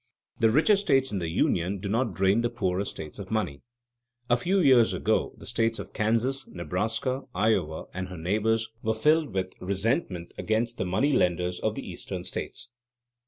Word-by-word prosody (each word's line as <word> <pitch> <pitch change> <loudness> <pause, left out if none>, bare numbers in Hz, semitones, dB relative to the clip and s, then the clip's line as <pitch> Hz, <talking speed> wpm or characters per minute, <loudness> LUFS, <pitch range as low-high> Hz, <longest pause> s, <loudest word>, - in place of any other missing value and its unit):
The 115 - +5
richer 155 - +5
states 135 -9 +2
in 100 - -1
the 85 -2 -2
Union 90 +2 +1
do 95 - -5
not 110 -1 0
drain 95 +5 +3
the 120 - +1
poorer 100 -5 -1
states 80 +1 -7
of 95 -1 -7
money. 110 -11 -2 0.7
A - - +7
few 180 +11 +1
years 130 -8 +5
ago - - 0
the - - -12
states 115 0 0
of - - -8
Kansas, 115 +5 +1
Nebraska, 110 - -2
Iowa, 95 -6 +1
and 95 0 -4
their 90 -1 -8
neighbors 110 +6 +1
were 110 0 0
filled 150 +4 +3
with 95 -1 -2
resentment 95 - -1
against 115 +2 0
the 95 - 0
money 105 +11 +1
lenders 90 -4 +1
of - - -1
the - - -6
Eastern - - -5
states. 120 - -5
110 Hz, 175 wpm, -27 LUFS, 95-120 Hz, 0.7 s, A